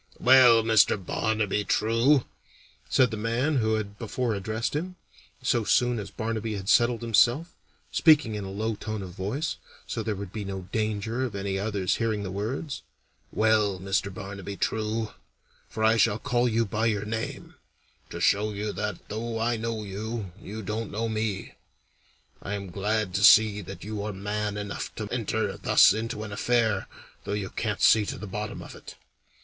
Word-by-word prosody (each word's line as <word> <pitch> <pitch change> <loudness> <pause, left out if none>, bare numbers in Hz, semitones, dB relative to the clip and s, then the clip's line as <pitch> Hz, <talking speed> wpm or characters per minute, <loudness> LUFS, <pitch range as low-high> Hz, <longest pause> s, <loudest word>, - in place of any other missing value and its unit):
"Well, 125 -3 +7
Mr. 110 -1 +4
Barnaby 105 +1 -1
True," 115 +7 +3 0.6
said 125 -2 +4
the 110 - -3
man 120 +7 0
who 110 -2 +2
had 100 -1 -4
before 120 +1 -2
addressed 110 +6 -2
him, 180 +5 -3 0.5
so 120 - +2
soon 120 +2 +2
as 100 - -6
Barnaby 110 -1 -3
had 100 0 -5
settled 120 -1 +3
himself, 120 +8 +3 0.4
speaking 150 -8 +5
in 105 -1 -4
a 95 - -6
low 110 +3 -2
tone 110 -1 -5
of 90 - -8
voice, 105 - -3 0.3
so - - -3
there 110 - -2
would 100 -1 -7
be 110 -2 -4
no 95 -1 -5
danger 110 +2 -1
of 120 -5 -3
any 100 -1 -2
others 100 -3 0
hearing 110 -3 -1
the 95 - -4
words 115 +9 -4 0.5
"Well, 110 -3 +2
Mr. 100 +1 -1
Barnaby 100 -1 -7
True 110 0 -1 0.6
for 110 - -3
I 110 +1 +5
shall 105 0 +3
call 120 +2 +1
you 115 0 +1
by 110 +3 0
your 105 -2 0
name, 110 +1 -5 0.6
to - - -6
show 105 +1 +2
you 105 +1 -3
that - - -4
though 115 +2 -4
I 120 +1 +1
know 115 -1 -3
you, 105 0 -5
you 110 +2 -7
don't 110 +2 -3
know 115 +2 -2
me 110 -3 -3 0.9
I 105 - -3
am 100 -3 -6
glad 105 +1 -1
to 100 - 0
see 110 -2 +7
that 95 +1 -9
you 105 0 -4
are 105 +1 -3
man 105 +1 -3
enough 105 -1 -5
to - - -4
enter - - -1
thus - - +6
into 110 0 -3
an 105 - -7
affair, 110 -1 +1 0.4
though - - -4
you 100 -2 -3
can't 105 -3 -2
see 110 - +6
to - - -4
the 110 - -7
bottom 105 +1 -5
of - - -10
it. - - -11
110 Hz, 175 wpm, -27 LUFS, 100-115 Hz, 0.9 s, Well